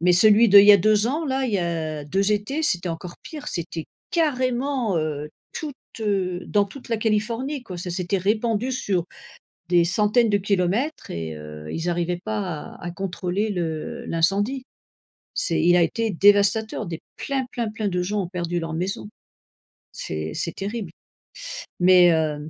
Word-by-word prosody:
mais 180 +1 +4
celui 215 +5 +6
d'il 200 0 +9
y 205 - +10
a 200 - +9
2 210 +3 +3
ans 305 +6 -1
là, 265 -2 0
il 245 - -2
y 200 - +2
a 160 -4 -2
2 195 +7 +1
étés, 240 +10 -1
c'était 180 - +1
encore 170 +1 -6
pire, 300 -2 -9
c'était 165 -1 -4 0.3
carrément, 255 - 0
heu, 150 -1 -3 0.2
toute, 300 -3 -5 0.3
heu, 190 -4 0
dans 205 -1 +2
toute 250 +7 -12
la 230 - +1
Californie, 230 +6 -1
quoi. 185 -7 -8
Ça 180 0 -4
s'était 180 +2 -1
répandu 220 +5 0
sur 190 -8 0 0.7
des 175 -1 +5
centaines 210 +5 +3
de 205 - +3
kilomètres 200 - -1
et 80 -1 -4
heu, 75 0 -9
ils 165 +2 -2
arrivaient 175 0 -1
pas 215 -1 -1 0.4
à - - -14
à 175 - -3
contrôler 190 +3 -2
le 165 -4 -4
l'incendie. 200 +10 +1 0.7
C'est 165 - +1
il 175 +1 +5
a 175 - +5
été 225 +7 0
dévastateur, 205 +3 +3
des 165 -2 -5 0.2
plein, 270 -2 -2
plein, 235 -3 -2
plein 215 -1 -2
de 180 -2 -1
gens 205 +3 -1
ont 180 - -5
perdu 175 -1 -2
leur 165 -1 -4
maison. 190 +6 -3 0.8
C'est 80 0 -4
c'est 170 - -3
terrible 200 -2 -4 0.9
mais, 180 -1 +7
heu, 155 -1 -1
195 Hz, 170 wpm, -23 LUFS, 170-220 Hz, 0.9 s, y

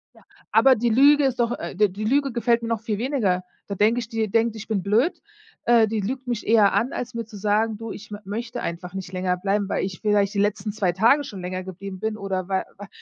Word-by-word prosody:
Ja. - - -19 0.3
Aber 270 -1 +6
die 235 +1 0
Lüge 285 +5 +5
ist 255 -2 0
doch 235 0 +1
äh, - - -6
d-die 205 +1 +1
Lüge 275 +5 +1
gefällt 235 0 +1
mir 230 - -4
noch 230 -2 -1
viel 215 -2 -2
weniger. 220 -7 0 0.2
Da 200 - -4
denke 215 +5 +3
ich, 230 -1 -6
die 225 -1 -1
denkt, 225 +2 +1
ich 220 0 -8
bin 205 -4 -1
blöd. 225 - +1 0.4
Äh, 235 -2 +5
die 220 0 -2
lügt 255 +6 -4
mich 240 -3 -3
eher 215 -2 +4
an, 215 +6 +1
als 250 +1 -5
mir 230 -1 -4
zu 210 -1 -11
sagen: 215 +2 +1
„Du, 225 0 -6
ich 210 0 -10
m 205 - -5
möchte 225 +4 -5
einfach 175 +1 -5
nicht 190 -1 -7
länger 185 0 0
bleiben, 200 +2 -1
weil - - 0
ich 185 -2 -7
vielleicht 205 -2 +2
die 200 - -1
letzten 205 0 0
2 200 -4 +1
Tage 230 +11 +4
schon 200 -8 -8
länger 185 +1 -4
geblieben 190 +1 -8
bin 220 0 -2
oder 190 -3 -3
weil 190 -1 0
weil“ 205 0 -9
215 Hz, 250 wpm, -24 LUFS, 195-235 Hz, 0.4 s, Aber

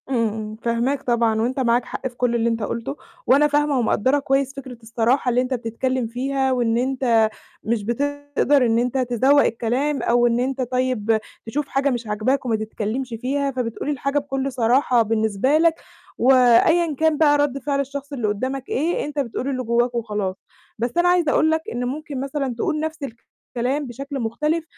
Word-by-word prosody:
إمم، 220 -4 -1
فاهماك 235 +5 -1
طبعًا، 230 -2 +1
وأنت 255 +4 -1
معاك 240 -1 +2
حق - - -4
في 250 - -11
كل 240 -1 0
اللي 235 0 +1
أنت 230 -1 -2
قُلته، 235 +6 -4 0.3
وأنا 290 +3 +5
فاهمة 295 -2 +1
ومقدرة 260 +4 +2
كويس 270 -1 0
فكرة 260 -3 -8
الصراحة 235 +4 +1
اللي 245 +1 +2
أنت 255 +1 -2
بتتكلم 245 +1 -2
فيها، 265 +3 -1
وإن 235 -3 +1
أنت 245 -3 +2 0.3
مش 225 -1 -1
بتقدر 285 +3 +1
إن 230 0 +2
أنت 250 +2 -1
تذوّق 260 +3 +3
الكلام، 250 +6 -1
أو 240 0 +3
أنت 250 +3 0
طيب 250 -3 0 0.3
تشوف 275 +5 -3
حاجة 275 +1 +1
مش 240 -3 -3
عاجباك 220 +6 0
وما 230 -3 +1
تتكلمش 220 +3 -4
فيها، 280 +2 -1
فبتقول 245 -1 -4
لي 295 - +1
الحاجة 275 +1 -1
بكل 275 -1 -3
صراحة 245 0 +3
بالنسبة 220 +5 +1
لك، 330 0 +3 0.4
وأيًا 270 +7 +4
كان 315 -1 +3
بقى 290 -2 +4
رد 290 -2 0
فعل 280 +1 -1
الشخص 280 +1 -5
اللي 240 -6 -1
قدامك 255 +6 -3
إيه، 325 +6 0
أنت 295 0 -4
بتقول 255 0 -3
اللي 255 -2 -2
جواك 240 +1 +1
وخلاص. 210 -5 -2 0.4
بس 240 +1 -1
أنا 350 +1 +4
عايزة 350 -4 +3
أقول 315 +2 +3
لك 320 0 +1
إن 245 +1 -3
ممكن 285 +1 -5
مثلًا 275 -2 -3
تقول 305 +5 -1
نفْس 315 0 -4 0.6
الكلام 260 +4 -1
بشكل 275 +3 -6
مختلف، 300 +8 -1
255 Hz, 175 wpm, -22 LUFS, 235-280 Hz, 0.6 s, وأنا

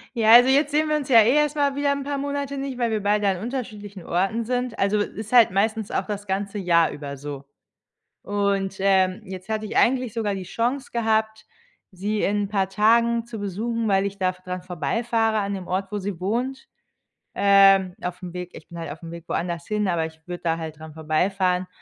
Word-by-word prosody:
Ja, 225 -1 +5
also, 245 +2 +9
jetzt 285 +2 +3
sehen 305 +1 +1
wir 305 - +2
uns 285 -3 -3
ja 230 -3 +8
eh 230 +4 +4
erst 300 0 +2
mal 285 -2 +1
wieder 285 0 +1
'n 280 -1 -2
paar 285 0 -3
Monate 280 0 -3
nicht, 270 -2 -4
weil 235 -2 0
wir 215 -2 -1
beide 205 0 +1
an 190 -2 +1
unterschiedlichen 210 -4 -6
Orten 195 +6 0
sind. 250 -1 -2
Also, 200 +2 +1
ist 215 +2 -4
halt 240 -3 +7
meistens 215 +2 0
auch - - -1
das 205 -1 -5
ganze 200 +2 -2
Jahr 170 -3 +3
über 140 -1 -7
so 140 0 -7 0.8
und, 200 -1 -1
ähm, 190 0 +2
jetzt 185 0 -9
hatte 215 0 -2
ich 210 - -6
eigentlich 250 -3 +2
sogar 215 -3 -1
die 190 - -5
Chance 245 +8 -2
gehabt, 220 -2 0 0.5
sie 205 +3 -2
in 205 +1 +1
'n - - -3
paar 195 -2 0
Tagen 230 +3 +3
zu 235 -2 -8
besuchen, 220 +3 -2
weil 195 0 +2
ich 200 0 -4
da 185 -1 +2
dran 180 0 -7
vorbeifahre 225 +5 0
an 200 0 -2
dem 190 -2 -6
Ort, 190 +1 -2
wo 210 - -2
sie 195 -2 -4
wohnt. 250 +7 -2 0.7
Ähm, 195 -2 +5
auf'm 180 0 -5
Weg 180 0 -6
ich - - -13
bin 170 - -9
halt 165 -3 -5
auf'm 165 +2 -9
Weg 170 0 -9
woanders 170 0 -3
hin, 210 -2 0
aber 165 -2 0
ich 160 0 -10
würde 175 0 -7
da 165 -1 0
halt 160 -2 -7
dran 160 -1 -10
vorbeifahren. 180 +4 0
205 Hz, 210 wpm, -24 LUFS, 185-230 Hz, 0.8 s, also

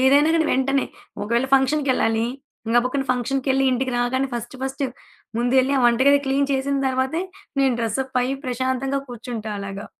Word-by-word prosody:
ఏదైనా 285 +4 +5
గానీ 320 -1 +2
వెంటనే, 270 +1 +1 0.4
ఒకవేళ 235 +5 +1
ఫంక్షన్‌కెళ్లాలి. 265 -5 +2 0.5
గముక్కున 255 +3 +2
ఫంక్షన్‌కెళ్ళి 265 +2 +1
ఇంటికి 255 0 -1
రాగానే 260 +2 +1
ఫస్ట్ 240 +3 -5
ఫస్ట్ 270 +1 -2 0.5
ముందెళ్లి 255 +3 +2
ఆ - - +2
వంటగది 265 +4 +5
క్లీన్ 275 +1 +1
చేసిన 275 +1 0
తర్వాతే 260 +7 0 0.4
నేను 265 -2 +3
డ్రెస్ 230 +3 -1
అప్ 260 -1 -2
అయి 265 +2 -1
ప్రశాంతంగా 260 +2 -1
కూర్చుంటా 230 -2 -6
అలాగా. 195 +1 -6
260 Hz, 145 wpm, -22 LUFS, 245-270 Hz, 0.5 s, ఏదైనా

